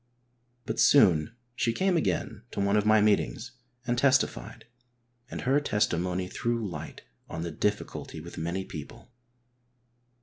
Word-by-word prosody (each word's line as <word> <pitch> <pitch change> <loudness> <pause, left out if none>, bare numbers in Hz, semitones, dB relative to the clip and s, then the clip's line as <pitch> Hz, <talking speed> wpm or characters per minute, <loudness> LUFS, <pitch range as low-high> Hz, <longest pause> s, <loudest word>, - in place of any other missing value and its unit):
But - - -3
soon 90 - +5 0.2
she 115 -1 0
came 190 +6 +1
again 95 - -1
to - - -4
one 100 +1 +2
of 105 0 +2
my 110 0 +6
meetings 105 - +1 0.3
and 120 0 0
testified, 130 - +1 0.6
and - - -5
her 135 +3 +3
testimony 90 - 0
threw 115 +2 -2
light 90 - -8 0.3
on 80 - -4
the 85 - -4
difficulty 105 -2 -3
with 85 +2 -10
many 85 +4 -3
people. 75 +10 -10
105 Hz, 135 wpm, -28 LUFS, 85-120 Hz, 0.6 s, my